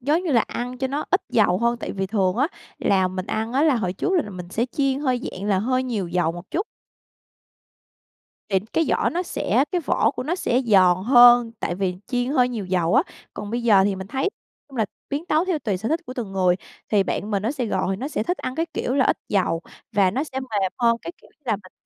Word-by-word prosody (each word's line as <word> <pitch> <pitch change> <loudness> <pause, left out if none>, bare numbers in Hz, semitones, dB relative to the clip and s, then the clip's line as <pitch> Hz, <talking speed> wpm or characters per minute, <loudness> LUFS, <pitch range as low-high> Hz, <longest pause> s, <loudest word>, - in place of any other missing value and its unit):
giống 300 +8 +1
như 345 - -2
là 235 - +5
ăn 245 +3 -4
cho 265 - 0
nó 285 +3 -3
ít 370 - +3
dầu 200 -5 +3
hơn, 235 +1 +1
tại - - -5
vì 195 -1 -2
thường 190 -1 +1
á, 275 +4 +3 0.3
là 190 -2 +2
mình 185 +1 -5
ăn 225 +2 -2
á, 275 +3 +2
là 305 -4 +4
hồi 185 -6 -1
trước 380 - -2
là 330 - +3
là 205 - -9
mình 180 -2 -8
sẽ 225 +5 0
chiên 275 -1 0
hơi, 255 -4 0
dạng 185 - -7
là, 195 -2 +3
hơi 255 +5 +1
nhiều 215 -8 -2
dầu 170 -1 +1
một 175 +2 -10
chút. 380 +5 -1 1.8
Thì 195 -2 +3
cái 325 - +2
vỏ - - +2
nó 355 +3 -1
sẽ 260 - +1
cái 360 - +1
vỏ 305 - +2
của - - -5
nó 320 +6 -1
sẽ 255 -8 +1
giòn 185 -5 +5
hơn, 240 -1 +7
tại 175 - -1
vì 185 -1 -1
chiên 245 0 -1
hơi 250 -4 +3
nhiều 225 -5 -4
dầu 180 0 +1
á. 265 - +6 0.3
Còn 205 - -6
bây 235 +1 -2
giờ 210 -5 +5
thì 200 - +1
mình 190 - -6
thấy, 265 +6 -3
nói 395 - +1 0.4
chung 270 - -12
là, 220 - +2 0.3
biến 290 +4 -2
tấu 315 +1 +2
theo 365 -5 0
tùy 210 -8 -1
sở 215 +5 -3
thích 320 +4 0
của 255 - -6
từng 220 -7 -5
người. 185 -2 +3 0.3
Thì 205 -2 +3
bạn 205 +2 -3
mình 200 -2 0
nó 225 - 0
sẽ 265 -4 -2
gọi 190 -2 -1
nó 265 +7 -4
sẽ 260 - -2
thích 355 +8 -2
ăn 255 - -4
cái 330 +3 -1
kiểu 250 - -2
là 270 -2 +3
ít - - +2
dầu 180 -4 +1 0.3
và 195 -3 +4
nó 270 +9 -1
sẽ 265 -3 -5
mềm 205 -7 -1
hơn, 235 -2 +3
cái 340 - -6
kiểu - - -19
như - - -49
là 235 - 0
mình 185 -2 -16
235 Hz, 260 wpm, -23 LUFS, 195-265 Hz, 1.8 s, hơn